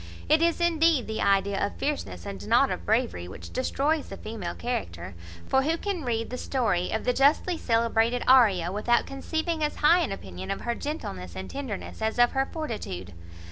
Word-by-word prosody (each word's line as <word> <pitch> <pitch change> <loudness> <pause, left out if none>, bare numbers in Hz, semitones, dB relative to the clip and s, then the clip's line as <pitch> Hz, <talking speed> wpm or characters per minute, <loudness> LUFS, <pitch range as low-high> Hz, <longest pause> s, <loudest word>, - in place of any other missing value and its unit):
It 310 +1 +4
is, 335 0 +2
indeed, 330 -5 +3
the 220 0 -3
idea 195 0 +2
of 200 - -2
fierceness, 95 - -3
and 100 +1 -7
not - - +4
of - - -5
bravery, 85 0 0
which 95 - -10
destroys 285 +4 0
the - - -7
female 215 -5 -5
character; 90 - -4 0.3
for 265 - +3
who 320 +4 0
can 385 -3 -3
read 230 -2 -2
the 250 - -4
story 225 -9 0
of 220 - -2
the 250 - +1
justly 290 +7 +3
celebrated 230 -2 +1
Arria 205 -10 +5
without 235 +4 +2
conceiving 315 +4 -2
as 300 - 0
high 335 +4 +5
an 335 - -1
opinion 95 - -7
of - - -2
her 235 - -1
gentleness 95 - -5
and 95 0 -6
tenderness 245 -7 -6
as 220 +1 -1
of 240 0 +5
her 270 0 0
fortitude? 215 - -5
240 Hz, 185 wpm, -27 LUFS, 190-295 Hz, 0.3 s, Arria